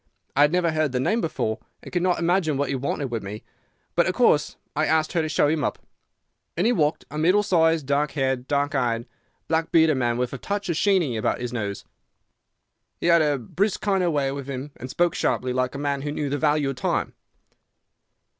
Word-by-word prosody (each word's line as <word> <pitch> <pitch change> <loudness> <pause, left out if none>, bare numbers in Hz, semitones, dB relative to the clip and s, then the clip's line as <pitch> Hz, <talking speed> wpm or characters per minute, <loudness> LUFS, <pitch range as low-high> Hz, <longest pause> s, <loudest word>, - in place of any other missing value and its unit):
I 140 - +4
had 150 +1 +5
never 175 -1 +2
heard 155 -3 0
the 125 - +1
name 220 - +1
before 110 - -2 0.2
and - - -10
could 175 - +1
not 180 0 +2
imagine 170 -3 +1
what 140 0 -1
he 140 - 0
wanted 135 0 -2
with 115 -2 -2
me; 100 +2 -7 0.5
but, - - +3
of - - -1
course, - - +3 0.2
I - - +1
asked 155 0 +1
her 170 - +2
to 155 - -2
show 155 -1 +3
him 150 0 0
up. - - -1 0.8
In 175 - +1
he 235 - +4
walked, 155 -8 0
a 150 - -4
middle 185 +6 +4
sized, 165 -6 +2
dark 140 +1 0
haired, 130 -2 -1
dark 145 0 0
eyed, 120 -4 0 0.4
black 160 0 0
bearded 160 -3 +4
man, 120 -2 0
with 125 +1 -2
a 135 - -5
touch 200 -1 -3
of 170 - 0
the - - -1
Sheeny 175 - +2
about - - 0
his 125 -1 -4
nose. 105 -4 -4 1.1
He - - -4
had 170 -1 +5
a 150 -2 +2
brisk 185 - -1
kind 195 -3 +1
of 175 - +2
way 140 -3 0
with 140 -1 -6
him 135 +2 -5
and 130 - -8
spoke 175 +4 +1
sharply, 125 0 0
like 130 +1 -1
a - - -3
man 140 -1 -1
who 145 +1 -3
knew 145 -1 -3
the 145 - -1
value 150 -2 +2
of 130 - -9
time." - - -1
145 Hz, 225 wpm, -24 LUFS, 130-165 Hz, 1.1 s, had